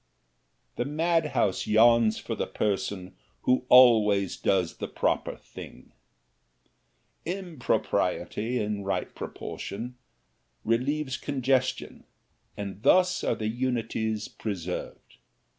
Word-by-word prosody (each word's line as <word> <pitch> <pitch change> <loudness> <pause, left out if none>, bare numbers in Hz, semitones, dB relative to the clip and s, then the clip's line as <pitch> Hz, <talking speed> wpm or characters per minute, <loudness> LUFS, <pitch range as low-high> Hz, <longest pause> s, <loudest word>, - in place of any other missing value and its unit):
The 120 - -1
madhouse 155 - 0
yawns 110 0 +5
for - - -5
the - - -2
person 95 -2 -2 0.3
who 125 0 +1
always 110 -6 +6
does 95 -3 0
the - - -4
proper - - -1
thing. - - -12 1.3
Impropriety, 160 - -1
in 105 -1 -2
right 100 - -2
proportion, 120 +5 -6 0.7
relieves 130 +4 0
congestion, 130 -2 -1 0.5
and 100 -1 -6
thus 185 +8 +4
are - - +1
the 110 - -3
unities 115 -2 -2
preserved. 90 -5 -6
115 Hz, 90 wpm, -27 LUFS, 105-130 Hz, 1.3 s, always